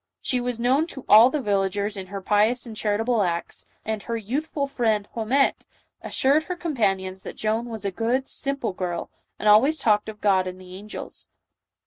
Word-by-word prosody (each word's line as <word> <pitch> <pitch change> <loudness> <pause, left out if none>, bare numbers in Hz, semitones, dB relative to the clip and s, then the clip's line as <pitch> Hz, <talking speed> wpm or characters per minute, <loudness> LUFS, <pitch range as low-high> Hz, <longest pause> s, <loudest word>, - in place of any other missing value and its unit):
_ - - -62 0.2
She 250 -1 -1
was 245 -1 -3
known 265 +7 +2
to 270 -6 -8
all 225 +4 +8
the 285 0 -2
villagers 200 0 0
in 190 -1 -6
her 195 +1 -6
pious 215 +6 +2
and 225 -2 -8
charitable 220 +2 +1
acts, 170 -3 -2 0.2
and 220 -1 -2
her 230 +2 -3
youthful 280 +7 -2
friend 220 -6 0
Haumette 240 +5 +1 0.3
assured 290 +4 +2
her 360 - -3
companions 195 - -1
that - - -8
Joan 220 +2 -1
was 220 -3 -6
a 200 - 0
good, 240 +7 -1
simple 275 -7 -2
girl, 180 -2 -4 0.3
and 215 - -2
always 250 +10 +6
talked 215 -5 +2
of 210 -1 -9
God 190 -3 +2
and 185 0 -6
the 185 -1 -12
angels. 210 +3 -7
220 Hz, 185 wpm, -24 LUFS, 200-255 Hz, 0.3 s, all